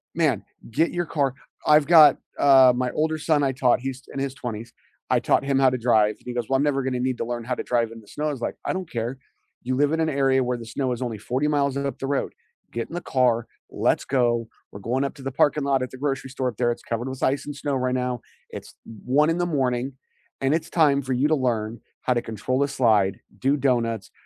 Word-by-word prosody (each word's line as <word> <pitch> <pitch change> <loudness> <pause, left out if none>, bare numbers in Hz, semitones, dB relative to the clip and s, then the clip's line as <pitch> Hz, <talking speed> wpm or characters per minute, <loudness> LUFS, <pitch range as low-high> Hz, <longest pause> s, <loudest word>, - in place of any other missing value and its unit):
Man, 150 - +1 0.3
get 160 +8 +1
your 175 -1 -1
car 140 -5 0 0.3
I've 150 -1 +5
got, 155 -5 +8 0.2
uh 135 -2 +7
my 125 0 -1
older 155 +1 0
son, 150 -2 +1
I 135 - +2
taught 125 -2 +2
he's 130 0 -5
in 135 - -4
his 135 -1 -2
20s, 115 -3 -6 0.4
I - - +3
taught - - +2
him 135 -1 +1
how 135 -1 +5
to 130 - -2
drive, 110 -3 +3
and - - -25
he 125 - -5
goes, 120 -2 -2
"Well, 135 - +1
I'm 135 - +2
never 135 -2 +1
gonna 125 -1 -1
need 130 -1 -1
to - - -3
learn 120 -1 -4
how 125 +2 -2
to - - -4
drive 115 -2 0
in 115 - -10
the 105 - -18
snow," 150 +1 -3
I - - 0
was 135 - -6
like, - - -3
"I - - 0
don't 185 -3 -4
care, 120 +3 -3 0.5
you 130 +1 -1
live 145 +2 +2
in 160 - 0
an 160 - +2
area 135 -2 +2
where 125 0 -1
the 115 - -9
snow 125 +2 -2
is 120 - -6
only 115 -4 -3
40 130 +8 -1
miles 140 -2 +1
up 140 0 -3
the 135 - -3
road, 140 -1 -1 0.4
get 115 0 -3
in - - -13
the 175 - -3
car, 120 -3 +1 0.2
let's - - 0
go, 120 -3 +1 0.2
we're 100 - -9
going 125 +7 -1
up 140 - -3
to 140 - -12
the 135 -1 -5
parking 145 0 +2
lot 135 -2 +2
at 130 - -6
the 130 - -9
grocery 135 -1 -2
store 130 -1 -2
up 120 - -3
there, 120 -1 +2
it's 120 - -5
covered 120 +3 -3
with 130 - -7
ice 135 +1 +1
and 145 -1 -6
snow 140 -1 -2
right 130 0 0
now. 125 -2 -2 0.3
It's - - -9 0.3
1 150 +5 +3
in 165 - +1
the 175 - +1
morning, 130 -4 -1 0.5
and 135 +3 +2
it's 165 - -3
time 145 -4 +3
for 130 0 -5
you 130 +4 +2
to 155 - +3
learn 115 -4 -2 0.2
how 125 - +2
to 120 - 0
control 115 +4 -3
the 140 0 +1
slide, 105 -7 +2 0.2
do 140 +3 +1
donuts, 115 -5 0
130 Hz, 260 wpm, -24 LUFS, 120-140 Hz, 0.5 s, got